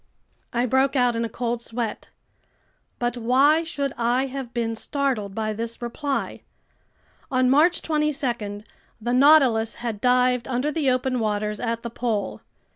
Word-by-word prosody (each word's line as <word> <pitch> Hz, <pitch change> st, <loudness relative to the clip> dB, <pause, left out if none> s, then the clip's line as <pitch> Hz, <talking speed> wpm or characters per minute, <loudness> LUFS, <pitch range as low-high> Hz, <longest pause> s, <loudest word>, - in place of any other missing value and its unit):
I 240 Hz, +1 st, +1 dB
broke 265 Hz, +3 st, +2 dB
out 245 Hz, -2 st, +3 dB
in 230 Hz, -, -1 dB
a 230 Hz, -, -2 dB
cold 235 Hz, +1 st, -3 dB
sweat. 230 Hz, -2 st, -4 dB, 0.9 s
But 240 Hz, 0 st, -2 dB
why 270 Hz, +7 st, +4 dB
should 280 Hz, -5 st, -3 dB
I 240 Hz, +3 st, +2 dB
have 265 Hz, -2 st, -6 dB
been 230 Hz, -2 st, -1 dB
startled 230 Hz, -6 st, -2 dB
by 215 Hz, -1 st, -1 dB
this 230 Hz, +2 st, -4 dB
reply? 270 Hz, +4 st, -3 dB, 0.9 s
On 255 Hz, -1 st, +2 dB
March 325 Hz, +5 st, +4 dB
22 265 Hz, -10 st, -1 dB, 0.4 s
the 240 Hz, +2 st, -2 dB
Nautilus 255 Hz, -5 st, +5 dB
had 230 Hz, -4 st, -5 dB
dived 250 Hz, -1 st, +2 dB
under 260 Hz, +4 st, -1 dB
the 295 Hz, -3 st, +1 dB
open 255 Hz, 0 st, 0 dB
waters 210 Hz, -1 st, -1 dB
at 230 Hz, -1 st, -2 dB
the 235 Hz, -, -5 dB
pole. 225 Hz, -5 st, -2 dB
245 Hz, 145 wpm, -24 LUFS, 230-270 Hz, 0.9 s, Nautilus